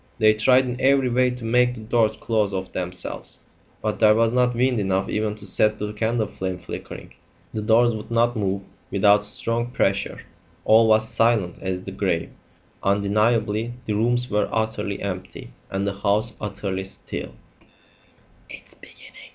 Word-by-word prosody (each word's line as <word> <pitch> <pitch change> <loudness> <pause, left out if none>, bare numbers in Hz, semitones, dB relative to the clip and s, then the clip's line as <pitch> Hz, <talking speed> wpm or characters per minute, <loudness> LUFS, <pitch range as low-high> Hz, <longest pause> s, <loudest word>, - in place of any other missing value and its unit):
They 110 -1 +5
tried 125 +4 +4
in 125 0 -4
every 135 -1 +3
way 125 +1 +3
to 125 -2 -6
make 125 +2 +3
the 110 - -9
doors 110 0 +1
close 105 -3 0
of 95 0 -4
themselves, 90 0 -4 0.4
but 110 -1 -2
there 105 0 +6
was 115 0 +3
not 125 0 +2
wind 125 0 +2
enough 95 -1 0
even 105 0 -1
to 105 -1 -8
set 110 +1 +3
the 105 0 -4
candle 110 +1 0
flame 95 -2 -4
flickering. - - -9 0.4
The 110 - -3
doors 115 +2 +4
would 110 0 -8
not 120 +1 +2
move 100 -2 -1 0.3
without 100 +1 +4
strong 115 +3 -1
pressure. 100 -5 -1 0.4
All 110 +1 +6
was 110 0 +4
silent 110 -7 +1
as 95 -1 -3
the 95 - -7
grave. 95 -4 -1 0.5
Undeniably 105 +3 +1
the 105 - -1
rooms 120 +3 +1
were 105 -3 0
utterly 110 -3 -2
empty, 95 -1 -6 0.2
and 95 +1 -2
the 100 - -1
house 105 +3 +1
utterly 100 -2 -4
still. 95 - -5
110 Hz, 155 wpm, -23 LUFS, 100-115 Hz, 0.5 s, there